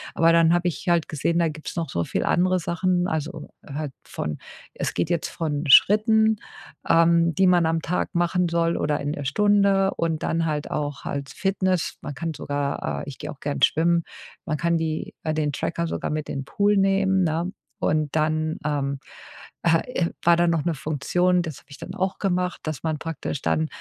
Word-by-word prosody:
Aber 165 0 +5
dann 165 0 +5
habe 175 0 +1
ich 175 - -8
halt 170 -2 +2
gesehen, 160 +3 0
da 170 -1 +2
gibt's 155 0 -7
noch 165 -2 -2
so 85 - -1
viel - - -2
andere 185 +1 +2
Sachen, 175 +1 0
also, 160 +2 -4 0.2
halt 145 0 -4
von 75 -1 -4 0.4
es - - -3
geht 165 - -1
jetzt 170 -2 -1
von 155 -2 -3
Schritten, 220 - +6 0.5
ähm, 170 0 +4
die 190 +3 +4
man 175 -2 +4
am 165 0 +1
Tag 180 +2 -2
machen 175 +1 +2
soll 170 0 +1
oder 150 0 0
in 145 +1 -2
der 145 -2 -5
Stunde 200 +4 +3
und 160 -2 -1
dann 165 0 0
halt 150 -2 -2
auch 145 -2 -3
als 140 -1 -4
Fitness. 185 -3 0
Man 145 - -6
kann 165 +1 -3
sogar, 145 -1 -3
äh - - -7
ich 140 - -7
gehe - - -6
auch 145 - -12
gern 145 0 -3
schwimmen. 170 +2 +3 0.4
Man 155 - -1
kann 170 +2 +1
die 160 -1 -3
äh, 155 - -1
den 150 -1 0
Tracker 170 +4 -2
sogar - - -3
mit 155 0 -3
in - - -3
’n - - -9
Pool 205 +7 +2
nehmen, 195 -1 +3
ne? 170 +2 -1 0.3
Und 155 -1 0
dann, 155 0 0
ähm, 140 -2 -1 0.6
äh, 165 -1 +4 0.2
e - - -1
war 170 0 +5
da 175 0 +3
noch 165 -3 +1
’ne 170 -2 0
Funktion, 175 +5 +1
das 160 -5 -6
habe - - -25
ich 145 - -11
dann 185 - -7
auch 190 -1 -2
gemacht, 180 -2 -1
dass 155 -3 -5
man 160 -2 -1
praktisch 165 -3 -4
dann 80 -1 +1
165 Hz, 200 wpm, -24 LUFS, 150-180 Hz, 0.6 s, Schritten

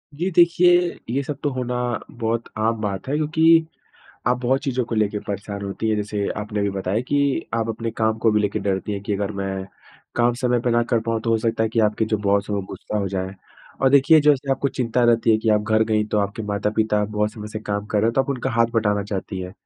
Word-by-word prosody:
जी 175 +6 -1
देखिए, 175 0 +4
ये 130 +4 0
सब 145 0 -5
तो 145 - +2
होना, 125 -1 -3 0.4
बहुत 115 0 -2
आम 110 +1 0
बात 100 0 -3
है, 140 - 0
क्योंकि, 160 +2 +4 0.6
आप 125 +1 +3
बहुत 130 +2 +2
चीज़ों 130 -2 -1
को 115 - -4
ले 110 -2 +2
के 105 0 -4
परेशान 100 0 -5
होती 100 +3 -3
हैं, 110 - +2
जैसे 105 -1 -2
आपने 105 0 -3
अभी 100 - 0
बताया 95 +3 -1
कि 145 - +2 0.4
आप 115 0 -1
अपने 115 +1 -3
काम 110 0 +1
को 110 0 +3
भी 105 - +3
लेकर 105 - 0
डरती 100 +1 -2
हैं, 100 - -3
कि 100 - -3
अगर 100 +1 -2
मैं, 95 -1 -3 0.5
काम 120 0 +3
समय 125 -1 +2
पे 120 - 0
ना 120 0 +3
कर 115 - +3
पाऊँ 115 -1 0
तो 115 +1 -2
हो 115 - +4
सकता 115 0 0
है 110 - +1
कि 115 0 0
आपके 105 +1 +2
जो 110 0 0
बॉस 100 0 +1
हैं, - - 0
वो 100 - -2
गुस्सा 105 - -4
हो 100 -1 -1
जाएँ, 95 0 -3 0.5
और 135 - +5
देखिए, 140 +3 +6
जैसे 145 -2 +2
आपको 140 +1 0
चिंता 125 -2 0
रहती 115 -1 +3
है 110 - +5
कि, 110 0 -2
आप 105 -1 +3
घर 110 +1 +2
गईं, 105 -1 +1
तो 105 - 0
आपके 100 +2 -2
माता-पिता, 105 +1 +1
बहुत 105 0 -1
समय 105 -1 -8
से 110 - -3
काम 100 0 -1
कर 105 - 0
रहे 110 - +2
हैं, - - 0
तो 135 - +4
आप - - -12
उनका 130 -1 -2
हाथ 115 0 +3
बटाना 105 -2 +1
चाहती 95 0 -4
हैं। 90 0 -6
110 Hz, 255 wpm, -22 LUFS, 105-125 Hz, 0.6 s, देखिए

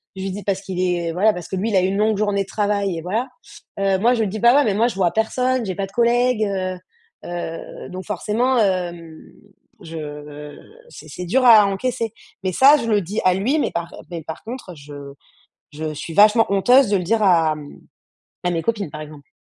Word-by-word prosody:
je 190 - -7
lui 195 - -3
dis 205 +2 -6
parce 195 0 -1
qu'il 185 -2 -4
est 175 -2 0
voilà, 205 +5 +3
parce 175 -2 -7
que 190 - -3
lui, 205 +5 -1
il - - 0
a 185 - +4
eu - - +1
une 195 +1 -1
longue 215 0 +2
journée 205 -1 0
de - - -17
travail 200 -4 -1
et - - -5
voilà. 220 +9 -2 0.5
Heu, 195 -1 +1
moi, 240 +4 +3
je 225 - 0
dis: 210 +2 -4
«Bah, 240 +4 +5
ouais, 290 - +5
mais 210 - +1
moi, 230 +3 +3
je - - -7
vois 185 -3 +1
personne, 250 +3 0
j'ai 190 -2 -4
pas 195 +1 -2
de - - -19
collègues, 240 -1 +2
heu». 185 -2 -3 0.5
Heu, 175 -1 -6
donc 185 +1 -7
forcément, 220 +6 0
hem, 175 -5 -2 0.6
je 150 -2 -8 0.3
c'est - - -13
c'est 180 - -7
dur 255 +9 +1
à 220 -4 +8
encaisser, 230 +2 -2 0.3
mais 185 - 0
ça, 275 - +7
je 230 - -4
le 210 -2 +3
dis 200 +5 -3
à 185 - +5
lui, 245 +11 0
mais - - 0
par, 170 0 -4
heu - - -11
mais 165 -2 -6
par 160 +1 -8
contre, 230 -6 -8
je 145 -1 -12 0.8
je 155 +1 -5
suis 160 +3 -7
vachement 215 +4 +6
honteuse 245 +6 +4
de 205 - +3
le - - -3
dire 220 +4 +1
à, 165 -5 +3
mmh 145 -1 -12 0.7
à 175 - +2
mes 165 -1 -1
copines 205 -8 -2
par 150 - -7
exemple. 150 -2 -11
195 Hz, 230 wpm, -21 LUFS, 175-220 Hz, 0.8 s, à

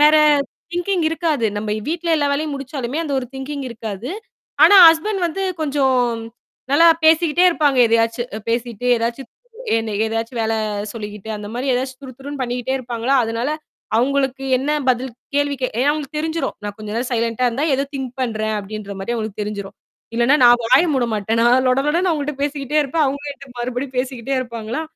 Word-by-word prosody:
வேற 300 +1 +7 0.6
திங்கிங் 355 -1 0
இருக்காது. 315 -8 0
நம்ப 210 0 -3 0.2
வீட்ல 335 +1 -2
எல்லா 290 -2 +1
வேலையும் 300 +1 -1
முடிச்சாலுமே, 275 0 -4
அந்த 290 - -4
ஒரு 250 - -4
திங்கிங் 270 +1 -5
இருக்காது. 225 - -6 0.6
ஆனா, 410 - +7
ஹஸ்பண்ட் 360 +3 0
வந்து 385 +4 -3 0.2
கொஞ்சம் 280 -3 +1 0.3
ம் - - -8 0.5
நல்லா 330 +4 +6 0.2
பேசிக்கிட்டே 330 +2 +4
இருப்பாங்க, 295 -5 +1
எதையாச்சு, 230 +1 +1
அ - - -6
பேசி்ட்டே 240 0 -1
எதாச்சு 235 +3 -2 0.5
என்ன 225 -1 -3
எதாச்சு 225 +2 -3
வேலை 225 0 0 0.4
சொல்லிக்கிட்டு 210 -1 -7
அந்தமாரி 230 +6 -5
எதாச்சு 260 +1 -3
துருதுருன்னு 270 +1 -8
பண்ணிக்கிட்டே 245 +1 -2
இருப்பாங்களா! 240 +1 -2
அதனால 230 +4 -2 0.5
அவுங்களுக்கு 270 +1 0 0.2
என்ன 275 - -2 0.2
பதில், 255 +1 0 0.2
கேள்வி 285 0 +1
கே 255 - +1
ஏனா 270 +3 +3
அவுங்களுக்கு 300 0 -5
தெரிஞ்சிடும். 320 +1 -2
நான் 205 -1 -5
கொஞ்ச 215 -1 -8
நேரம் 245 +2 -2
சைலன்ட்டா 230 +1 0
இருந்தா, 265 +6 -1
ஏதோ 275 - 0
திங்க் 265 -2 -4
பண்றேன் 220 -3 -1
அப்பிடின்றமாரி 200 0 -6
அவுங்களுக்கு 215 -2 -4
தெரிஞ்சிரும். 205 -2 -6 0.4
இல்லன்னா, 240 +5 +4
நான் 240 0 +7
வாய 255 +7 +5
மூட 255 -3 +1
மாட்டேன். 215 +2 -1
நான் 250 +2 +4
லொட 255 +1 +3
லொடன்னு 345 +5 +2
அவர்கள்ட்ட 300 -2 -2
பேசிகிட்டே 285 0 -2
இருப்பேன் 300 +3 0
அவுங்க 280 +2 -2
என்ட்ட 280 0 -13
மறுபடியும் 250 +2 -4
பேசிக்கிட்டே 255 0 -2
இருப்பாங்களா! 235 +1 -4
255 Hz, 165 wpm, -20 LUFS, 230-290 Hz, 0.6 s, வேற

